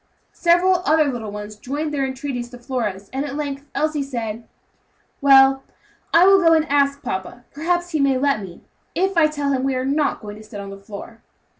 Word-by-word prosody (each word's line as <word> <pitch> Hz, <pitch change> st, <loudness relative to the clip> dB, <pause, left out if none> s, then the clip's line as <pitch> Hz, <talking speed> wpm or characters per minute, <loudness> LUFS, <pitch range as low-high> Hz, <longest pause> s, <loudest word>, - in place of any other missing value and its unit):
Several 355 Hz, +2 st, +3 dB
other 310 Hz, -1 st, +4 dB
little 225 Hz, -3 st, -5 dB
ones 210 Hz, 0 st, -7 dB
joined 295 Hz, +6 st, -4 dB
their 275 Hz, -2 st, 0 dB
entreaties 260 Hz, -2 st, -5 dB
to 245 Hz, -, -11 dB
Flora's, 225 Hz, -6 st, -4 dB
and 270 Hz, +1 st, -1 dB
at 280 Hz, -1 st, -5 dB
length 285 Hz, -1 st, -4 dB
Elsie 305 Hz, 0 st, 0 dB
said, 230 Hz, -4 st, -5 dB, 0.7 s
"Well, 270 Hz, -1 st, +6 dB, 0.5 s
I 340 Hz, +2 st, +6 dB
will 390 Hz, 0 st, +6 dB
go 330 Hz, -2 st, +5 dB
and 320 Hz, 0 st, +2 dB
ask 280 Hz, 0 st, +2 dB
papa; 190 Hz, +6 st, -5 dB
perhaps 350 Hz, +3 st, -1 dB
he 310 Hz, -, 0 dB
may 275 Hz, -2 st, +3 dB
let 275 Hz, -4 st, +1 dB
me, 185 Hz, -3 st, -10 dB, 0.3 s
if 385 Hz, +1 st, +1 dB
I 325 Hz, -2 st, +5 dB
tell 290 Hz, -2 st, -2 dB
him 260 Hz, -1 st, 0 dB
we 270 Hz, -1 st, 0 dB
are 255 Hz, 0 st, -1 dB
not 285 Hz, +2 st, 0 dB
going 210 Hz, -1 st, -8 dB
to 215 Hz, -, -12 dB
sit 210 Hz, -1 st, -9 dB
on 200 Hz, 0 st, -7 dB
the 195 Hz, -, -10 dB
floor." 210 Hz, +3 st, -10 dB
275 Hz, 200 wpm, -21 LUFS, 230-305 Hz, 0.7 s, Well